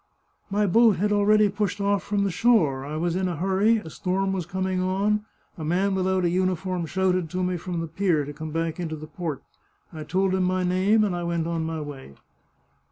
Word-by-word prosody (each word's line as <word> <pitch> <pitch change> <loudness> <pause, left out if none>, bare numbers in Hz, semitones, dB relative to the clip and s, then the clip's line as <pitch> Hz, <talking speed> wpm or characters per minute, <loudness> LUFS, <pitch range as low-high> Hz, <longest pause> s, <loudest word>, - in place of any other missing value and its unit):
" - - -43
My 210 - +3
boat 220 +2 +5
had 210 +4 0
already 210 +1 +4
pushed 205 -1 -2
oflf 200 0 +1
from 205 -1 -1
the 200 - 0
shore, 170 - +2
I 145 +2 -5
was 170 +1 -1
in 185 0 0
a 175 - -2
hurry, 195 +7 +2
a 165 -7 -7
storm 190 +3 -1
was 180 -4 -3
coming 185 0 -1
on, 200 +3 0 0.3
a - - -4
man 185 +5 +1
without 190 -1 +1
a - - +3
uniform 185 -1 -1
shouted 185 -1 0
to 185 +2 -2
me 180 0 0
from 175 0 -4
the 165 - -4
pier 165 -2 0
to 145 - -7
come 155 +2 -6
back 165 +2 -2
into 160 -3 -3
the 155 0 -8
port. 155 -4 -5 0.5
I 155 -1 -6
told 185 +5 0
him 190 - +1
my 185 0 +1
name, 190 +5 +3
and 195 -4 0
I 175 - -3
went 170 -1 -1
on 165 -1 -2
my 160 -1 -3
way." 135 - -9
185 Hz, 225 wpm, -25 LUFS, 165-195 Hz, 0.5 s, boat